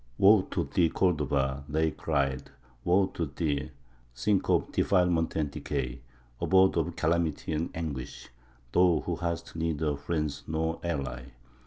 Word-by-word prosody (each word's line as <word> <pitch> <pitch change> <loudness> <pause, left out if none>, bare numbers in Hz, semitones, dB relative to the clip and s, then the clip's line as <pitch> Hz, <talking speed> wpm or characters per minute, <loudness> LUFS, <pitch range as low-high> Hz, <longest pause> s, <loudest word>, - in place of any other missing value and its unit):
"Woe 100 +1 +7
to - - -1
thee, 80 +4 +2
Cordova!" 70 -7 0
they 80 +2 +1
cried, 70 -4 -1 0.3
"woe 95 +3 +4
to 85 - -2
thee, 70 0 -2 0.5
sink 100 - +1
of - - +2
defilement 90 -4 +2
and 75 -3 0
decay, 60 -2 -4 0.4
abode 95 0 +4
of - - -1
calamity 80 -1 0
and 80 +2 -1
anguish, 75 -6 -5 0.4
thou 85 -5 +4
who 85 - -1
hast 85 -2 -4
neither 80 -2 -1
friend 75 -1 -2
nor 80 +1 -1
ally! 70 -7 -3
80 Hz, 135 wpm, -29 LUFS, 70-85 Hz, 0.5 s, Woe